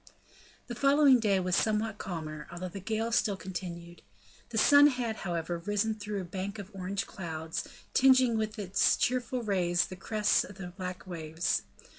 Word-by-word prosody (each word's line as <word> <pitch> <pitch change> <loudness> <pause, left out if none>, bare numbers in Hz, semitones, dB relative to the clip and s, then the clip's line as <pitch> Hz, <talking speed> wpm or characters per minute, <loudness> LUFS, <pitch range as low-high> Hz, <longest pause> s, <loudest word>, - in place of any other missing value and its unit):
The 240 - -6
following 275 +1 +5
day 205 -4 +2
was 180 -1 0
somewhat 215 -1 0
calmer, 155 -4 -6
although 175 +1 -5
the 195 - -7
gale 220 +4 -2
still 205 -3 +1
continued. 175 -2 -7 0.5
The 230 - -4
sun 285 +5 +7
had, 245 -5 -1
however, 170 -1 -3
risen 205 +4 0
through 210 -1 -5
a - - -6
bank 190 +3 -5
of 200 0 -8
orange 195 +1 -3
clouds, 160 -3 -5 0.3
tingeing 260 -3 +5
with 220 0 -2
its 195 -2 +2
cheerful 250 0 0
rays 175 -4 +1
the 185 - -8
crests 210 +2 +1
of 195 - -11
the 185 -2 -7
black 180 0 -7
waves. 165 -2 -2
195 Hz, 165 wpm, -30 LUFS, 175-225 Hz, 0.5 s, sun